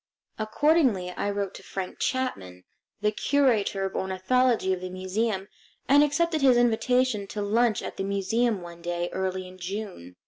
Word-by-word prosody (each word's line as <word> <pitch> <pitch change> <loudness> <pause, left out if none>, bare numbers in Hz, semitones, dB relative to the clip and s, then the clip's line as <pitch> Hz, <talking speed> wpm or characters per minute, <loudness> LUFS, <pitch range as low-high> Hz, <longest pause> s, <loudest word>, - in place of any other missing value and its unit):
Accordingly, 220 - +2
I 200 - -2
wrote 200 -1 -2
to - - -10
Frank 190 -2 -6
Chapman, 95 - -2 0.4
the 210 0 +2
curator 220 -6 +1
of 190 - -4
ornithology 190 +2 +1
of 180 - -4
the 185 - -5
museum, 190 +2 -2 0.4
and 285 +2 +6
accepted 315 +2 +1
his 260 -3 +5
invitation 240 -2 +2
to 210 - -5
lunch 220 +1 +2
at - - -6
the - - -2
museum 200 +2 0
one 170 0 -10
day 175 0 -2
early 185 0 -2
in 185 0 -13
June. 185 - -6
205 Hz, 160 wpm, -26 LUFS, 185-245 Hz, 0.4 s, and